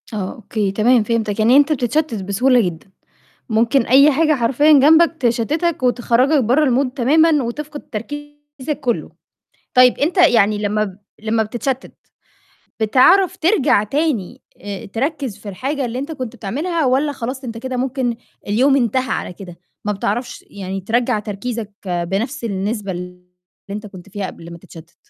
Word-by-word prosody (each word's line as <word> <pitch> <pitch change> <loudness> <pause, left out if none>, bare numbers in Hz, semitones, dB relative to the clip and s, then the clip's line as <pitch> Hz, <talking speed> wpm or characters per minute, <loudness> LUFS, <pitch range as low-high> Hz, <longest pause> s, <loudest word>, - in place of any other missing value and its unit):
آه، 195 -3 -3
أوكي، 210 -2 -2
تمام، 225 +3 +3
فهمتاك، 220 -2 -1
يعني 235 +5 +5
أنت 290 +2 +4
بتتشتت 250 -4 -1
بسهولة 245 +6 +3
جدًا، 180 -1 -5 0.6
ممكن 230 +5 +2
أي 275 +5 +5
حاجة 310 +2 +2
حرفيًا 270 +5 +3
جنبك 315 +4 +5
تشتتك 270 +7 0
،وتخرّجك 250 +3 +2
برّا 255 +7 +3 0.2
الMood 250 - -6
تمامًا، 300 +3 +3
وتفقد 290 +5 -6
تركيزك 290 +3 -7
كُلّه، 245 -3 -2 0.6
طيب 250 0 +5
أنت 330 +7 0
يعني 230 - +4
لمّا 210 +1 0
ب 195 -2 -7 0.2
لمّا 220 +1 0
بتتشتت، 245 +4 -4 0.9
بتعرف 265 - +4
ترجع 300 - +2
تاني 270 - -2 0.5
تركّز 270 -3 -2
في 205 - -10
الحاجة 270 +8 -3
اللي 245 +1 -4
أنت 285 +5 -5
كنت 255 -5 -6
بتعملها، 305 - -2
والّا 275 +4 +1
خلاص 260 0 -6
أنت 230 -2 -6
كده 260 +2 -4
ممكن 255 -2 -1 0.3
اليوم 255 +7 +3
انتهى 255 +1 0
على - - -4
كده، 180 -1 -11 0.3
ما 210 - +1
بتعرفش 210 +5 -3
يعني 195 -1 -5
ترّجع 235 +3 0
تركيزك 210 +1 -5
بنفس 195 +10 -2
النسبة 200 -1 -3
اللي 180 0 -8 0.5
أنت 210 +2 -5
كنت 190 -1 -12
فيها 200 -1 -4
قبل 170 -1 -10
ما 170 - -10
تتشتت؟ 165 0 -15
240 Hz, 150 wpm, -19 LUFS, 210-280 Hz, 0.9 s, يعني